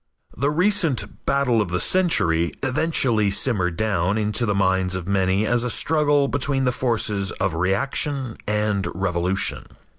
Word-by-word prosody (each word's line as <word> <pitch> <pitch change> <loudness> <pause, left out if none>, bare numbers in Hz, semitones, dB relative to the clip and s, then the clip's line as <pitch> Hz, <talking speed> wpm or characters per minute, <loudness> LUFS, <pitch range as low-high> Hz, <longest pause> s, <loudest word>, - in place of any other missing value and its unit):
The 140 +4 0
recent 175 -3 0
"battle 130 -5 +1
of 100 - -3
the 90 +1 -2
century" 85 - +1
eventually 130 -6 +1
simmered 95 -5 0
down 100 -2 0
into 105 +2 0
the 105 - 0
minds 95 -1 +1
of 90 -1 -5
many 95 +1 +1
as 120 +1 +1
a 125 - -2
struggle 145 0 +2
between 140 -1 -1
the 125 - +1
forces 110 -6 -1
of 95 -4 -2
reaction 120 - -1
and 105 -1 -1
revolution. 90 +1 0
105 Hz, 145 wpm, -22 LUFS, 95-135 Hz, -, struggle